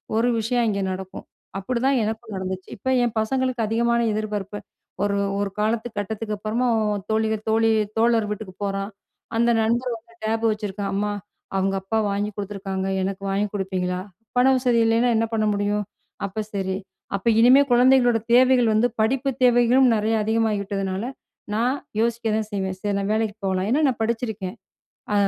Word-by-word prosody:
ஒரு 230 +2 +3
விஷயம் 235 +2 +1
அங்கே 200 -2 0
நடக்கும். 190 0 -7 0.3
அப்பிடிதான் 255 +6 +1
எனக்கும் 220 +1 -4
நடந்துச்சு. 185 0 -5
இப்ப 260 - -3
என் 235 -2 0
பசங்களுக்கு 255 +2 0
அதிகமான 235 +2 +1
எதிர்பார்ப்பு. 210 -1 -3 0.4
ஒரு, 200 0 +1 0.2
ஒரு 200 -1 0
காலத்து 220 +2 0
கட்டத்துக்கு 210 +1 -3
அப்பறமா 220 +4 -1 0.4
தோழிகள் 220 0 0
தோழி, 225 +1 +3 0.3
தோழர் 230 -1 +3
வீட்டுக்குப் 205 -2 -7
போறான். 195 +1 -2 0.4
அந்த 235 +1 +3
நண்பர் 240 +3 0
வந்து 230 +1 -22
டேப் 225 +1 0
வச்சிருக்கான். 205 -2 -3
அம்மா! 205 +1 0 0.5
அவுங்க 195 0 +1
அப்பா 205 +4 -2
வாங்கி 200 +1 -1
கொடுத்துருக்காங்க. 195 -2 -4 0.2
எனக்கு 195 +1 -3
வாங்கி 205 +2 +1
கொடுப்பீங்களா? 185 -2 -2 0.4
பண 250 - +5
வசதி 250 -2 +2
இல்லயின்னா 230 +2 +3
என்ன 225 +1 +2
பண்ண 215 -1 +1
முடியும்? 205 0 0 0.4
அப்ப 200 +2 -3
சரி. 190 -1 -1 0.4
அப்ப 195 +3 -4
இனிமே 255 +4 +7
குழந்தைங்களோட 245 -1 +5 0.2
தேவைகள் 250 -2 +5
வந்து 225 +3 +3
படிப்பு 260 +5 +1
தேவைகளும் 245 +1 +5
நிறைய 220 +1 +1
அதிகமாகி 220 -1 +1
விட்டதுனால, 195 0 -3 0.5
நான் 245 +5 +1 0.2
யோசிக்க 235 0 0
தான் 215 -1 -2
செய்வேன். 190 -2 -2
சரி 205 +1 -2
நான் 200 +1 -1
வேலைக்கு 220 -1 0
போகலாம். 190 0 0
ஏன்னா, 275 +6 +2
நான் 245 -3 -3
படிச்சிருக்கேன். 220 -4 -3 0.6
அ - - +2
220 Hz, 155 wpm, -23 LUFS, 200-235 Hz, 0.6 s, இனிமே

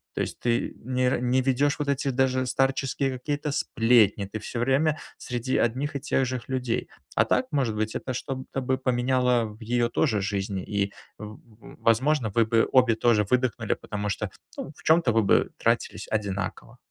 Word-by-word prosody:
То - - -1
есть - - -3
ты 120 -1 0
нер 125 0 0
не 125 +1 +2
ведешь 135 +3 +1
вот 150 - -2
эти 140 0 0
даже 130 0 +1
старческие 135 +1 0
какие-то 145 +3 -3
сплетни, 115 -6 +3
ты 105 +3 -6
всё 115 +3 -5
время 140 +5 +2 0.2
среди 125 +1 -3
одних 135 +5 0
и 140 - -2
тех 135 -2 +1
же 130 0 -5
людей. 125 -3 -2 0.3
А - - +5
так, - - +1
может 130 -7 0
быть, 110 +1 -2
это 130 - -3
что-то 130 +1 -4
бы 130 +1 0
поменяло 125 -1 +1
в 105 +2 -10
её 120 +1 +1
тоже 115 -5 +1
жизни, 100 -1 -2
и, 100 -1 -1 0.3
в 105 +1 -9 0.4
возможно, 120 0 +2
вы 115 -2 +4
бы 115 0 +2
обе 125 -3 +5
тоже 110 -2 +3
выдохнули, 125 -3 +1
потому 105 0 -4
что, 100 - -2 0.3
ну, - - -5
в - - -18
чем-то 160 -6 +4
вы 115 -1 +3
бы - - +3
тратились - - 0
одинаково. 100 +2 -3
125 Hz, 175 wpm, -26 LUFS, 110-135 Hz, 0.4 s, А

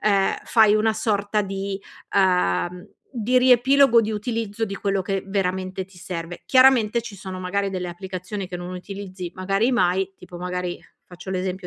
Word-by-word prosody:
ehm, 200 -2 +2
fai 220 -3 +5
una 215 +1 +3
sorta 210 -1 0
di 195 0 -4 0.3
uhm, 180 - +1 0.3
di 245 +3 +3
riepilogo, 255 0 +5
di 215 0 -2
utilizzo 225 0 -2
di 200 - -5
quello 195 -1 0
che 195 0 -2
veramente 190 -1 -2
ti 190 -1 -20
serve. 175 -1 -6
Chiaramente 255 -4 +5
ci 225 -3 -9
sono, 190 -1 -7
magari, 195 +2 -1
delle 180 -2 -3
applicazioni 185 +2 -6
che 180 -1 -6
non 175 +1 -6
utilizzi 185 -1 -7
magari 195 +6 +1
mai, 190 -3 +1
tipo, 180 -1 -11
magari, 180 0 -3 0.2
faccio 180 +1 -10
l'esempio 185 0 -3
195 Hz, 160 wpm, -23 LUFS, 180-215 Hz, 0.3 s, fai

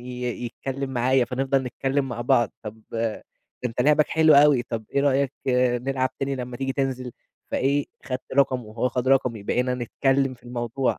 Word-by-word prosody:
ي 125 0 -7 0.2
يتكلم 135 +2 -5
معايا 130 0 +2
فنفضَل 135 +2 0
نتكلم 135 +2 -1
مع 120 -1 -5
بعض، 120 -1 +2
طب 110 0 -8
ده 115 -1 -2 0.4
أنت 125 0 -2
لعبك 150 +2 +4
حلو 160 -2 +5
أوي، 140 -3 +6
طَب 115 -3 -5
إيه 140 - +1
رأيك 140 -1 +2 0.5
نلعب 130 -1 0
تاني 135 0 -2
لمّا 125 -1 -5
تيجي 135 +1 -2
تنزل، 130 -3 -2 0.4
فإيه 140 +2 +1 0.2
خدت 130 -1 -5
رقمه 130 -3 +3
وهو 110 +4 -2
خد 125 +1 -1
رقمي، 125 -5 +2
بقينا 125 +4 0
نتكلم 135 +2 0
في - - -25
الموضوع 120 +1 -2
130 Hz, 170 wpm, -24 LUFS, 120-135 Hz, 0.5 s, أوي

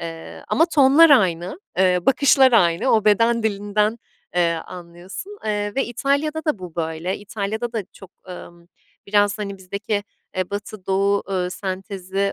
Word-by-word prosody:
eee, 165 -1 -8
ama 325 - +3
tonlar 300 +1 +6
aynı, 185 - +2 0.2
eee, 180 -1 +4
bakışlar 270 -1 +5
aynı, 175 +2 +3
o 215 -2 +3
beden 230 +2 +3
dilinden, 210 +1 0 0.4
eee, 170 -1 +3
anlıyorsun, 180 - -9
eee, 205 -1 -2
ve 270 - +1
İtalya'da 285 +6 -1
da 305 - 0
bu 180 -3 -9
böyle. 160 +3 -3
İtalya'da 215 +3 -4
da 220 -3 -2
çok, 195 -2 -14 0.2
emm, 175 -1 -11 0.4
biraz, 205 0 +2
hani, 200 -2 -5
bizdeki, 200 +2 -3 0.3
eee, 185 -1 -2
batı-doğu, 200 -1 -1
eee, 180 -1 -1
sentezi 195 +1 -3
200 Hz, 140 wpm, -21 LUFS, 185-230 Hz, 0.4 s, tonlar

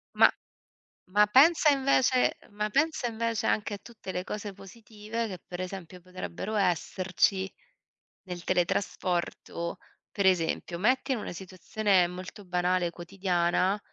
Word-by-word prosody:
Ma - - +7 0.8
ma 210 +2 +5
pensa 300 +7 +6
invece 265 -2 +3
ma 210 +1 -2
pensa 305 0 +1
invece 230 -1 -1
anche 210 -1 0
a - - -8
tutte 220 -5 -9
le 180 0 -3
cose 210 -1 -5
positive 215 +3 -6
che, 185 -4 -7
per 180 0 -6
esempio, 180 -1 -7
potrebbero 185 +3 -6
esserci 190 0 +1 0.7
nel 180 -2 -7
teletrasporto. 175 -1 -1 0.3
Per 200 -2 -1
esempio, 170 -1 +1
metti 255 +6 +2
in 235 - -2
una - - -5
situazione 190 +1 +1
molto 185 +3 -8
banale 180 0 +1
quotidiana, 180 +2 0
195 Hz, 125 wpm, -29 LUFS, 180-215 Hz, 0.8 s, Ma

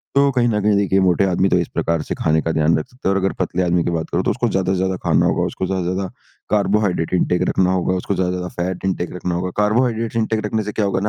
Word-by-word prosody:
तो 140 0 +5
कहीं 125 -2 +2
ना 105 - +1
कहीं 105 0 +3
देखिए, 95 -1 +2
मोटे 95 +1 +3
आदमी 95 +1 +1
तो - - +3
इस 85 - -1
प्रकार 85 -1 0
से - - -4
खाने 80 0 +1
का 80 - -1
ध्यान 80 +1 +2
रख 80 - -4
सकते 125 -4 -7
हैं - - +3
और - - +1
अगर 95 - 0
पतले 90 0 0
आदमी 85 -1 +1
की - - -1
बात 80 -1 -3
करूँ 90 +2 0
तो - - +1
उसको 120 -2 -1
ज़्यादा 95 -1 0
से - - +1
ज़्यादा 95 0 0
खाना - - +3
होगा, - - +1
उसको 95 - -3
ज़्यादा 95 -1 -1
से 90 - -1
ज़्यादा 95 0 -3 0.4
कार्बोहाइड्रेट 100 -5 +1
इंटेक 90 0 +1
रखना 95 -1 +2
होगा, 95 0 0
उसको 95 +2 -2
ज़्यादा 90 0 0
से 90 - -2
ज़्यादा 90 -1 -6 0.2
फैट 90 - -8
इंटेक 90 -2 -2
रखना 90 -1 -2
होगा। 90 +1 -2
कार्बोहाइड्रेट्स 115 +2 +1
इंटेक 110 -1 0
रखने 110 +1 -1
से 105 - -4
क्या 105 0 -1
होगा 100 -1 0
95 Hz, 285 wpm, -20 LUFS, 90-105 Hz, 0.4 s, तो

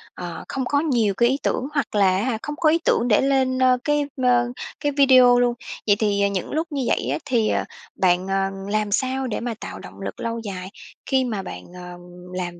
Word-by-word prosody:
ờ, 175 -3 -7
không 265 -1 -3
có 285 +3 +1
nhiều 240 -10 +1
cái 235 +5 +3
ý 270 - +1
tưởng 260 - -1
hoặc 280 -6 -2
là 190 -2 +4
á 195 - -1
hả, 240 -2 -1
không 295 - -4
có 310 0 +3
ý 330 +2 +3
tưởng 235 - +2
để 210 -3 +4
lên, 265 -1 +1
ơ, 255 -1 +4
cái, 295 0 +1 0.2
ơ, 245 -1 +3 0.3
cái 290 - 0
video 255 -3 +6
luôn. 245 -1 +2 0.3
Vậy 205 - +5
thì, 205 -2 +1
ờ, 200 - +4
những 195 -3 -3
lúc 320 +3 -1
như 280 -3 -2
vậy - - 0
á, - - 0
thì, 240 -6 +1
à, - - 0 0.3
bạn, 180 0 +2
ờ, 195 0 0 0.2
làm 210 0 0
sao 260 +4 0
để 230 - -3
mà 235 0 -3
tạo - - -7
động - - -12
lực - - -6
lâu 230 0 -3
dài 190 -4 -6 0.4
khi 265 -1 +2
mà 220 -6 -3
bạn, 190 - -8
ờ, 180 0 -9 0.4
làm 175 -1 -4
240 Hz, 235 wpm, -22 LUFS, 200-265 Hz, 0.4 s, video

